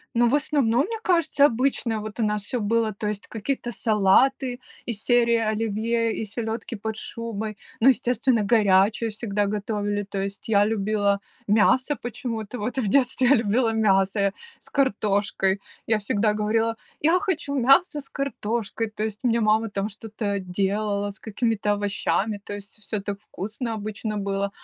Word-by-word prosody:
Ну, 240 +1 +4
в 265 - +3
основном, 280 -5 +2
мне 450 +3 -5
кажется, 335 -6 +3
обычно 235 -3 0
вот 215 +2 -8
у - - +2
нас 210 -1 0
всё 245 +4 -2
было, 220 +1 +1
то 210 - -3
есть 210 -1 -4
какие-то 240 +3 -3
салаты, 240 +5 +2 0.3
из 220 -3 -3
серии 235 -1 +4 0.2
оливье 225 +1 0
и 220 - -3
селёдки 225 +2 -4
под 220 +1 -4
шубой, 220 -2 -4 0.2
ну, 255 - +7
естественно, 245 -3 +2
горячую 210 +1 +4
всегда 205 -1 -1
готовили. 205 0 -2
То 195 0 -4
есть 200 +2 -6
я 205 -2 +5
любила 205 -1 +1 0.3
мясо 255 +7 +3
почему-то, 235 -2 -5
вот 245 +6 -3
в 235 - +1
детстве 255 +2 +3
я 280 - +7
любила 225 +1 +1
мясо 200 -2 +2
я 200 0 +2 0.3
с - - -8
картошкой, 200 -6 +1 0.3
я 220 - +3
всегда 210 +1 +1
говорила: 225 +2 +1 0.3
"Я 330 +5 +4
хочу 335 -8 -2
мясо 275 +5 +4
с 275 - -8
картошкой!", 230 -5 -3
То 215 - -2
есть 215 -1 -3
мне 235 -2 +2
мама 220 +1 +2
там 200 0 -2
что-то 210 -1 -4
делала, 200 +2 -1
с 200 - -9
какими-то 220 -1 -1
овощами, 205 +1 -1
то 205 - -7
есть 205 +1 -10
всё 210 - 0
так 200 0 -4
вкусно 215 +3 -5
обычно 215 0 -4
было. 200 0 -1
220 Hz, 165 wpm, -24 LUFS, 205-240 Hz, 0.3 s, ну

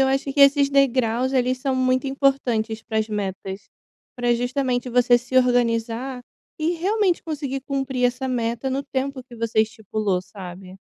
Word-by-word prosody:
eu 265 - +4
acho, 270 +1 +1
que 285 - 0
esses 280 0 +6
degraus, 260 -2 +2
eles 255 0 +1
são 265 -1 0
muito 255 +1 +1
importantes, 245 -5 0
pras 220 -1 -1
metas. 195 -1 -5 0.5
Pra 245 -1 +2
justamente, 250 0 -1
você 245 0 +5
se 245 +1 -3
organizar, 245 0 +1 0.4
e 320 +2 +1
realmente, 375 +1 +1
conseguir 285 -4 -4
cumprir 270 -2 -2
essa 255 +2 -2
meta, 240 0 -1
no 270 +2 -1
tempo 275 -1 -3
que 245 -1 -14
você 225 -1 +1
estipulou, 215 -3 -1
sabe? 185 -1 -10
250 Hz, 155 wpm, -23 LUFS, 225-270 Hz, 0.5 s, esses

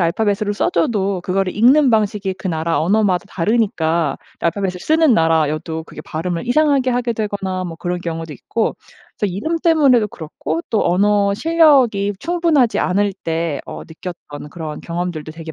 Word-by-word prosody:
알파벳으로 205 +4 0
써줘도 205 - 0
그거를 185 +1 -1
읽는 265 +6 +5
방식이 210 -4 0
그 190 - -8
나라 165 -1 -1
언어마다 185 +1 +2
다르니까 170 - 0 0.2
알파벳을 180 +1 -1
쓰는 315 - +3
나라여도 160 0 +1
그게 - - -11
발음을 170 +5 -4
이상하게 275 0 +2
하게 245 -1 -1
되거나 200 -4 -3
뭐 170 -2 -6
그런 175 +1 -3
경우도 165 -3 -5
있고 230 - -2 0.4
그래서 205 -4 -1
이름 315 - -2
때문에도 285 - +4
그렇고 160 -2 -5
또 220 - +1
언어실력이 205 - +3
충분하지 330 -8 +2
않을 200 +2 +1
때 165 +1 -1 0.2
어 - - -8
느꼈던 160 -3 -9
그런 155 -2 -6
경험들도 170 -3 -4
되게 160 0 -8
195 Hz, 370 characters per minute, -19 LUFS, 165-235 Hz, 0.4 s, 읽는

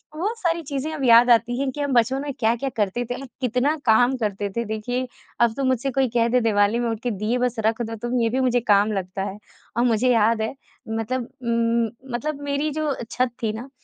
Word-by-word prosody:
वो 385 +8 -1
सारी 340 -5 0
चीज़ें 285 +2 -3
अब 290 -3 -4
याद 235 +1 +7
आती 240 +1 +3
हैं 275 -1 0
कि 290 - -5
हम 285 -2 -1
बचपन 250 +3 +2
में 285 -1 -4
क्या-क्या 235 +4 +1
करते 210 +4 0
थे 245 - -4
और 275 - -8
कितना 255 +5 +1
काम 245 +3 +4
करते 205 -3 -2
थे। 235 - 0
देखिए, 245 +4 -3 0.3
अब 235 -2 +4
तो 275 - -1
मुझसे 260 +1 0
कोई 265 +1 +2
कह 235 -1 +3
दे 250 +2 +3
दीवाली 210 0 +2
में 240 -1 0
उठ 225 -2 -3
के 245 - 0
दीये 215 +4 -1
बस 250 -1 0
रख 225 +2 +1
दो 225 0 -3
तुम, 240 +3 -2
ये 230 - +2
भी 255 +3 -1
मुझे 250 -2 +2
काम 205 +1 +4
लगता 190 0 -3
है, 200 0 -5 0.4
और 235 - +3
मुझे 240 +2 +2
याद 225 0 +3
है 220 - -2 0.4
मतलब 225 +2 -2
उम, 235 +1 -1
मतलब 290 +4 -3
मेरी 285 +2 -1
जो 310 +1 -2
अ, 275 -4 -2
छत 255 -1 0
थी 215 - +1
ना 240 +5 -7
240 Hz, 235 wpm, -23 LUFS, 225-265 Hz, 0.4 s, याद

